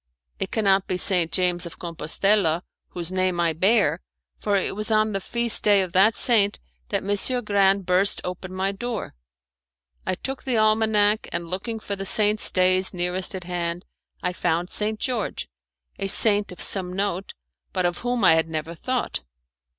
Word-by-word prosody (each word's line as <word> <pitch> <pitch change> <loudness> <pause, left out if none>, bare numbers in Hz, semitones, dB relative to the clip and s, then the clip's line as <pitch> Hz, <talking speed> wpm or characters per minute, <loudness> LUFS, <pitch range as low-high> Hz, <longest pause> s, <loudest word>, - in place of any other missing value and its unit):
"It - - -1
cannot 195 -3 +1
be 185 - -1
St. 180 -3 +2
James 180 -1 +1
of 170 - -12
Compostella, 170 +1 +1 0.2
whose 175 0 -4
name 185 -1 0
I 170 -1 +1
bear, 200 - +2 0.4
for 205 - 0
it 195 0 -1
was 215 +2 -4
on 215 0 +2
the 195 -1 -3
feast 235 +2 +2
day 205 -2 +4
of 185 - -7
that 195 +5 +4
saint 210 -4 +3 0.3
that 200 -2 -1
Messer 205 +6 0
Grande 195 -2 +2
burst 185 +3 +2
open 180 +1 -6
my 190 +1 -1
door." 230 +2 -5 0.9
I 185 - -2
took 270 +7 -6
the 255 -3 0
almanac 215 -1 +2
and 170 0 -4
looking 220 +5 -4
for 205 -1 -5
the 195 0 -5
saints' 210 +1 +3
days 185 0 +2
nearest 180 +2 0
at 185 - -6
hand 175 0 -4 0.4
I 180 - -1
found 175 0 -1
St. 215 0 -2
George 245 -5 -2 0.5
a 195 - -2
saint 205 0 +4
of 180 - -7
some 185 -2 +2
note, 195 -1 -3 0.4
but 185 -1 -1
of 175 0 -1
whom 245 -2 -2
I 180 - +7
had 160 0 +1
never 160 +1 -4
thought. 255 +8 -3
195 Hz, 175 wpm, -23 LUFS, 180-210 Hz, 0.9 s, I